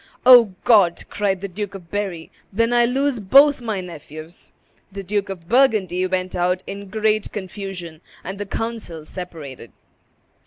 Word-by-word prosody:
"O 240 Hz, -6 st, +8 dB
God!" 200 Hz, -7 st, +4 dB
cried 195 Hz, -3 st, -1 dB
the 200 Hz, -, -3 dB
Duke 200 Hz, +1 st, -6 dB
of 175 Hz, -4 st, -12 dB
Berry, 195 Hz, -6 st, -4 dB, 0.2 s
"then 230 Hz, +4 st, +1 dB
I 240 Hz, 0 st, +4 dB
lose 265 Hz, +1 st, 0 dB
both 275 Hz, +7 st, +5 dB
my 220 Hz, -5 st, -3 dB
nephews!" 160 Hz, -1 st, -11 dB, 0.4 s
The 195 Hz, 0 st, -7 dB
Duke 200 Hz, +1 st, -2 dB
of 175 Hz, -4 st, -8 dB
Burgundy 205 Hz, -7 st, +2 dB
went 185 Hz, 0 st, -2 dB
out 180 Hz, +1 st, 0 dB
in 200 Hz, 0 st, -8 dB
great 215 Hz, 0 st, 0 dB
confusion, 185 Hz, -4 st, -7 dB, 0.2 s
and 195 Hz, +1 st, -7 dB
the 205 Hz, -, -4 dB
council 220 Hz, -9 st, -5 dB
separated. 155 Hz, -, -9 dB
195 Hz, 150 wpm, -21 LUFS, 180-220 Hz, 0.4 s, O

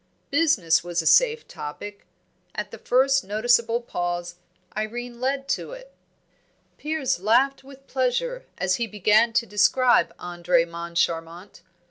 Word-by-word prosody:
Business 275 Hz, -, +3 dB
was 175 Hz, -1 st, -2 dB
a -, -, -12 dB
safe 465 Hz, -, +4 dB
topic; 200 Hz, +7 st, -8 dB, 0.5 s
at -, -, -4 dB
the -, -, -10 dB
first 270 Hz, +2 st, +2 dB
noticeable 230 Hz, +3 st, +2 dB
pause, 175 Hz, -4 st, -4 dB, 0.4 s
Irene 240 Hz, +3 st, -5 dB
led 270 Hz, +1 st, -1 dB
to -, -, -2 dB
it. -, -, -12 dB, 0.9 s
Piers 300 Hz, -, -1 dB
laughed 250 Hz, +8 st, +2 dB
with 275 Hz, 0 st, -15 dB
pleasure 275 Hz, -, -2 dB
as 180 Hz, 0 st, 0 dB
he 235 Hz, -, -2 dB
began 215 Hz, +2 st, +3 dB
to 235 Hz, -, +2 dB
describe 210 Hz, 0 st, +3 dB
Andre 175 Hz, -1 st, 0 dB
Moncharmont. 170 Hz, +1 st, -3 dB
230 Hz, 125 wpm, -24 LUFS, 175-270 Hz, 0.9 s, safe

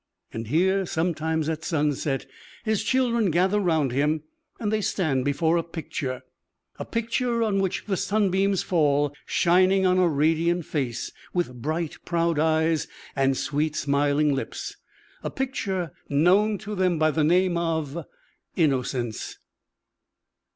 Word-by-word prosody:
And 115 Hz, 0 st, -5 dB
here 190 Hz, -, +2 dB
sometimes, 160 Hz, -2 st, -1 dB
at 160 Hz, 0 st, -2 dB
sunset, 145 Hz, -3 st, -1 dB, 0.4 s
his 220 Hz, -1 st, +1 dB
children 235 Hz, -4 st, +2 dB
gather 185 Hz, +5 st, +2 dB
round 160 Hz, -8 st, +1 dB
him, 150 Hz, +4 st, +1 dB, 0.4 s
and 210 Hz, -3 st, -1 dB
they 215 Hz, -, +1 dB
stand 155 Hz, -10 st, 0 dB
before 160 Hz, +4 st, +2 dB
a 165 Hz, -, 0 dB
picture 145 Hz, -6 st, -5 dB, 0.6 s
a -, -, -4 dB
picture 235 Hz, +1 st, 0 dB
on 205 Hz, -3 st, +1 dB
which 190 Hz, -2 st, -1 dB
the 200 Hz, -, 0 dB
sunbeams 195 Hz, -1 st, +1 dB
fall, 145 Hz, -4 st, +2 dB
shining 185 Hz, +2 st, +3 dB
on 185 Hz, 0 st, +3 dB
a 180 Hz, -, +4 dB
radiant 165 Hz, +3 st, +1 dB
face, 125 Hz, -6 st, -3 dB, 0.2 s
with 125 Hz, -9 st, -2 dB
bright, 160 Hz, +3 st, -2 dB
proud 170 Hz, -2 st, 0 dB
eyes, 160 Hz, 0 st, +2 dB, 0.3 s
and 135 Hz, -1 st, +2 dB
sweet, 150 Hz, +1 st, -1 dB
smiling 145 Hz, +1 st, +2 dB
lips 135 Hz, -, -4 dB, 0.5 s
a -, -, -3 dB
picture 195 Hz, -, -2 dB, 0.2 s
known 190 Hz, +9 st, +3 dB
to 210 Hz, +1 st, -7 dB
them 185 Hz, -3 st, +1 dB
by 155 Hz, 0 st, +3 dB
the 155 Hz, 0 st, +1 dB
name 180 Hz, +3 st, +3 dB
of 165 Hz, -2 st, -2 dB, 0.5 s
"Innocence." 130 Hz, -, -1 dB
165 Hz, 135 wpm, -25 LUFS, 145-190 Hz, 0.6 s, a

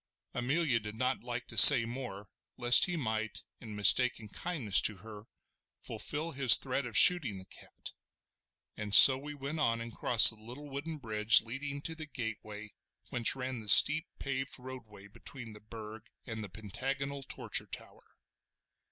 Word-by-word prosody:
Amelia 130 Hz, 0 st, -4 dB
did 105 Hz, 0 st, -11 dB
not 130 Hz, +2 st, -5 dB
like 120 Hz, 0 st, -8 dB
to -, -, -11 dB
say 125 Hz, -5 st, +9 dB
more, 115 Hz, -5 st, -11 dB, 0.3 s
lest 120 Hz, 0 st, +3 dB
he 180 Hz, -, -7 dB
might, 110 Hz, -5 st, -7 dB, 0.2 s
in 110 Hz, -3 st, -13 dB
mistaken 110 Hz, +1 st, +1 dB
kindness 130 Hz, -, -2 dB
to 105 Hz, -, -3 dB
her, 105 Hz, +2 st, -16 dB, 0.5 s
fulfil 155 Hz, +3 st, -8 dB
his 130 Hz, -5 st, +7 dB
threat 130 Hz, 0 st, -6 dB
of 115 Hz, -, -2 dB
shooting 145 Hz, -, +3 dB
the 95 Hz, -, -14 dB
cat: -, -, -15 dB, 0.8 s
and 105 Hz, -2 st, -1 dB
so 135 Hz, -, +8 dB
we 145 Hz, +3 st, -12 dB
went 145 Hz, +3 st, -9 dB
on 115 Hz, -6 st, -3 dB
and 115 Hz, 0 st, -11 dB
crossed 115 Hz, -2 st, +6 dB
the 110 Hz, -, -18 dB
little 125 Hz, +6 st, -14 dB
wooden 155 Hz, +4 st, -9 dB
bridge 110 Hz, -4 st, 0 dB
leading 140 Hz, +4 st, -9 dB
to 165 Hz, -, -8 dB
the 155 Hz, -1 st, -11 dB
gateway 110 Hz, -5 st, -10 dB, 0.4 s
whence 120 Hz, -4 st, -1 dB
ran 130 Hz, -2 st, -8 dB
the 105 Hz, -2 st, -11 dB
steep 155 Hz, -, +4 dB
paved 135 Hz, 0 st, -8 dB
roadway 125 Hz, -6 st, -15 dB
between 115 Hz, +2 st, -14 dB
the 105 Hz, -, -17 dB
Burg 110 Hz, 0 st, -14 dB, 0.2 s
and 110 Hz, -2 st, -9 dB
the 100 Hz, -, -11 dB
pentagonal 135 Hz, +8 st, -9 dB
Torture -, -, -6 dB
Tower. -, -, -14 dB
120 Hz, 160 wpm, -28 LUFS, 110-140 Hz, 0.8 s, say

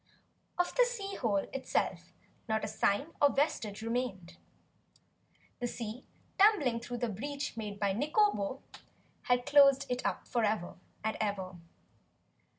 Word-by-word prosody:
Of 355 Hz, 0 st, +1 dB
the -, -, +5 dB
sea 435 Hz, -5 st, -3 dB
hole 205 Hz, -5 st, 0 dB
itself 270 Hz, -1 st, -2 dB, 0.4 s
not 220 Hz, 0 st, +1 dB
a -, -, -3 dB
sign 220 Hz, +9 st, 0 dB
nor 285 Hz, -, +7 dB
vestige 225 Hz, -8 st, -1 dB
remained. 230 Hz, -7 st, -3 dB, 1.2 s
The 245 Hz, -, -1 dB
sea, 230 Hz, +1 st, -6 dB, 0.3 s
tumbling 370 Hz, -, +5 dB
through 245 Hz, +1 st, -5 dB
the 240 Hz, -, -1 dB
breach 280 Hz, +8 st, -4 dB
made 210 Hz, -3 st, -5 dB
by 200 Hz, -2 st, +1 dB
Nikobo, 285 Hz, -, +1 dB, 0.6 s
had 245 Hz, -1 st, +2 dB
closed 275 Hz, -1 st, +6 dB
it 250 Hz, 0 st, -2 dB
up -, -, -2 dB
forever 215 Hz, -6 st, 0 dB, 0.3 s
and 220 Hz, 0 st, -1 dB
ever. 195 Hz, -3 st, -2 dB
245 Hz, 130 wpm, -32 LUFS, 210-285 Hz, 1.2 s, nor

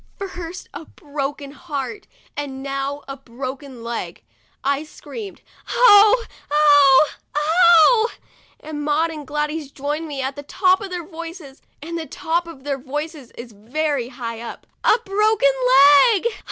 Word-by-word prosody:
First 365 Hz, -3 st, -7 dB
a 325 Hz, -, -8 dB
broken 285 Hz, -1 st, -6 dB
heart, 295 Hz, +4 st, -6 dB, 0.3 s
and 270 Hz, -2 st, -5 dB
now 275 Hz, +1 st, -4 dB
a 275 Hz, -, -6 dB
broken 260 Hz, 0 st, -8 dB
leg. 225 Hz, -, -5 dB, 0.4 s
I 280 Hz, +1 st, 0 dB
screamed, 395 Hz, +6 st, -10 dB, 0.2 s
" -, -, -20 dB
Oh! 435 Hz, 0 st, +6 dB, 0.2 s
oh! 290 Hz, -1 st, +6 dB, 0.3 s
oh!' 345 Hz, +8 st, +5 dB, 0.5 s
and 300 Hz, -1 st, -6 dB
Maud 305 Hz, +3 st, +1 dB
and 300 Hz, -3 st, -8 dB
Gladys 300 Hz, 0 st, -3 dB
joined 295 Hz, +4 st, -4 dB
me 285 Hz, -3 st, -6 dB
at 265 Hz, +1 st, -3 dB
the 285 Hz, -, -7 dB
top 370 Hz, +6 st, +2 dB
of 400 Hz, -, -6 dB
their 355 Hz, -2 st, -5 dB
voices, 330 Hz, -4 st, -10 dB, 0.2 s
and 335 Hz, +1 st, -5 dB
the 320 Hz, -, -6 dB
top 335 Hz, +5 st, -2 dB
of 285 Hz, -6 st, -11 dB
their 280 Hz, -1 st, -3 dB
voices 295 Hz, 0 st, -6 dB
is 235 Hz, 0 st, -9 dB
very 255 Hz, +5 st, -2 dB
high 235 Hz, -2 st, -7 dB
up. 235 Hz, -, -9 dB, 0.2 s
"A -, -, +5 dB
broken 405 Hz, -6 st, +3 dB, 0.6 s
leg 405 Hz, +1 st, -2 dB
295 Hz, 145 wpm, -21 LUFS, 275-335 Hz, 0.6 s, Oh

